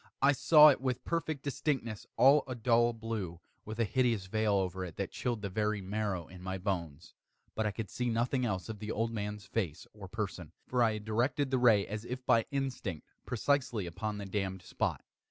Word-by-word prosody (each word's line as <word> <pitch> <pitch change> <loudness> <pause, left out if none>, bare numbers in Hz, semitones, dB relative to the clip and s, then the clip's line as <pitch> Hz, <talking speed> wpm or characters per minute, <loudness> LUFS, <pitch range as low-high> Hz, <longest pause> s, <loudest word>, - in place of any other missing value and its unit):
I 140 +1 +5
saw 150 +2 +8
it 135 - +2
with 125 -1 -1
perfect 160 -4 -2
distinctness 135 -6 -2
all 140 +3 +6
a 130 - -4
dull 120 0 +3
blue, 110 -7 -4 0.3
with 110 +1 -6
a - - +4
hideous 115 -4 +1
veil 110 +2 +1
over 95 -1 -1
it 85 -3 -7
that - - -3
chilled 120 -4 -2
the 100 - -2
very 105 +1 0
marrow 95 -3 -2
in 90 0 -12
my 95 +1 -3
bones; 85 -5 -4 0.4
but 110 -1 0
I - - 0
could 105 -2 -6
see 125 -1 -1
nothing 120 +3 +1
else 95 -6 -1
of 110 -2 -6
the 105 +1 -4
old 115 +1 -1
man's 105 -2 -4
face 90 -10 -3
or - - -9
person: - - -5
for 125 -1 0
I 115 -2 +4
had 105 -1 -6
directed 130 +6 0
the 130 - +2
ray 115 -5 +5
as 105 +1 -5
if 125 +2 -6
by 115 -1 +4
instinct, 130 - -3 0.2
precisely 125 -4 0
upon 105 +5 -4
the 100 - -5
damned 95 -2 -3
spot. - - -2
110 Hz, 205 wpm, -32 LUFS, 100-125 Hz, 0.4 s, saw